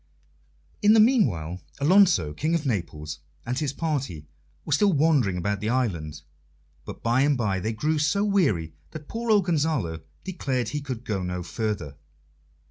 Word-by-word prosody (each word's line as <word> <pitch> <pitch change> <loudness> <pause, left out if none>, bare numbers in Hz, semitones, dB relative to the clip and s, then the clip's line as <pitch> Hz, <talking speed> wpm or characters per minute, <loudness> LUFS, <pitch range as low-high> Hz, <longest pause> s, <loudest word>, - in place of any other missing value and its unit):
In 210 +1 +6
the 225 - +6
meanwhile 95 - +2 0.2
Alonso, 160 - +4
King 155 - 0
of 160 -2 -2
Naples, 80 - -3 0.3
and 125 +3 -2
his 150 -4 -1
party 135 - -3 0.4
were - - -1
still 200 +8 +4
wandering 140 - +2
about 100 +3 -1
the 105 +2 -2
island; 85 - -2 0.6
but - - -9
by 120 +3 +2
and 145 -1 +3
by 100 -5 0
they 110 +4 -2
grew 150 +8 0
so 180 +8 +1
weary 135 - +1 0.2
that 155 -1 -8
poor 230 +1 -4
old 205 -4 +4
Gonzalo 150 - 0 0.2
declared 135 -9 -2
he 150 - -3
could 125 -4 -6
go 100 -3 -2
no 90 0 -3
further. 90 - -4
130 Hz, 160 wpm, -25 LUFS, -, 0.6 s, In